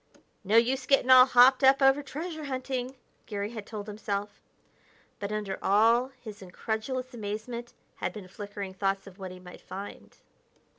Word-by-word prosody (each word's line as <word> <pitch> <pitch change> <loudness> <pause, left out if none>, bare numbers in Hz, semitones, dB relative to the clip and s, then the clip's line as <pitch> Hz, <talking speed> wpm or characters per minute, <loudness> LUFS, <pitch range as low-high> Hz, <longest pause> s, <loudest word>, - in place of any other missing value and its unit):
"No 210 +3 +3
use 255 +3 +2
getting 270 -2 +3
all 255 0 +9
hopped 255 +2 +6
up 265 +1 +6
over 270 +1 +4
treasure 310 +3 -6
hunting," 260 -1 -4 0.3
Garry 205 -1 -4
had 220 -3 -8
told 210 -2 -6
himself. 205 -1 -5 0.8
But 200 0 -4
under 210 -3 -3
all 230 +5 +4
his 215 -4 -10
incredulous 225 +7 -4
amazement 235 +2 -6 0.2
had - - -2
been 205 -4 -10
flickering 200 0 -7
thoughts 195 0 -1
of 195 0 -14
what 190 -1 -6
he 185 0 -10
might 180 0 -13
find. 200 +1 -9
220 Hz, 155 wpm, -28 LUFS, 200-255 Hz, 0.8 s, all